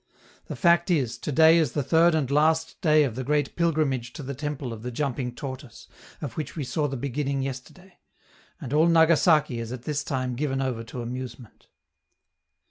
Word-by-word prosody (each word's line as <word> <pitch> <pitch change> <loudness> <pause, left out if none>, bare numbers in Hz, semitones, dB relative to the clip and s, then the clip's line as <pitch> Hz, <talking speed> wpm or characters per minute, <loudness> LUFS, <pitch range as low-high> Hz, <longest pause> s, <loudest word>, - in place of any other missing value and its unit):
The - - -5
fact 170 -1 +3
is, 130 -9 +1
to - - -4
day 160 +3 +6
is 150 -7 0
the 145 - -1
third 165 +4 +4
and 140 -4 -1
last 160 +2 +1
day 155 -4 +4
of 130 -6 -1
the 130 - -3
great 145 +1 0
pilgrimage 150 -8 0
to 145 - -8
the 140 +1 -5
temple 145 -3 -4
of 110 - -9
the 125 - -5
jumping 125 -1 -3
Tortoise, 130 -3 -8 0.3
of 140 -6 -5
which 155 - -5
we 155 - -3
saw 145 +4 -1
the 135 -1 -4
beginning 140 +1 -2
yesterday; 135 +8 -8 0.6
and 130 - -6
all 155 +3 +4
Nagasaki 160 -5 +4
is 115 0 -5
at 125 -1 -7
this 150 0 -2
time 130 -2 -2
given 135 +1 -2
over 130 -4 -2
to 120 +2 -7
amusement. 125 -1 -8
140 Hz, 190 wpm, -25 LUFS, 125-155 Hz, 0.6 s, day